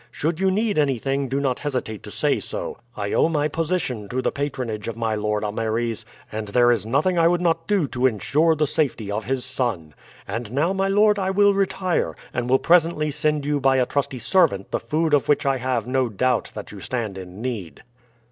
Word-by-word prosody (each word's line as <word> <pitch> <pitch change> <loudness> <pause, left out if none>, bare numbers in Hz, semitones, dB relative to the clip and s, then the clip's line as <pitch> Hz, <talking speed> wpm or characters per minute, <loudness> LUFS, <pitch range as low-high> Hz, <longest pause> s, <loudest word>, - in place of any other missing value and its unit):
Should 160 +2 -2
you 190 0 +3
need 205 -1 +1
anything, 135 -1 0
do 135 +2 0
not 135 -3 0
hesitate 125 -7 -3
to - - -10
say - - 0
so. - - -6 0.2
I 100 -1 -2
owe - - +3
my 150 -2 +1
position 155 - -2
to 130 - -2
the - - 0
patronage 130 -7 -3
of 115 -1 -4
my 115 -1 -1
lord 105 0 -1
Ameres, 110 +1 -2 0.3
and 110 0 -4
there 120 +3 +4
is 115 -2 0
nothing 155 +9 +2
I 165 - +5
would 175 +1 +2
not 165 -2 0
do 200 -8 +2
to 125 +1 +2
insure 150 +8 +2
the 155 0 +1
safety 130 -8 -1
of 105 +1 -3
his 130 0 -1
son. 120 - -2 0.3
And 110 +2 -4
now, 160 +7 +1
my 195 0 0
lord, 205 +1 +4
I 190 -1 0
will 200 +1 +4
retire, 190 -2 0 0.2
and 120 0 -2
will 130 - +5
presently 165 -2 +3
send 150 0 0
you 145 0 +1
by 135 -1 +3
a 125 - +3
trusty 135 0 -2
servant 100 - +2
the - - 0
food 155 +6 -1
of 145 - +3
which 145 - +3
I 135 -1 +2
have 125 -3 -1
no 130 0 0
doubt 125 +3 0
that 105 - -7
you 100 -2 -10
stand 115 -5 -3
in 95 0 -9
need." 110 -9 -5
130 Hz, 215 wpm, -23 LUFS, 115-160 Hz, 0.3 s, I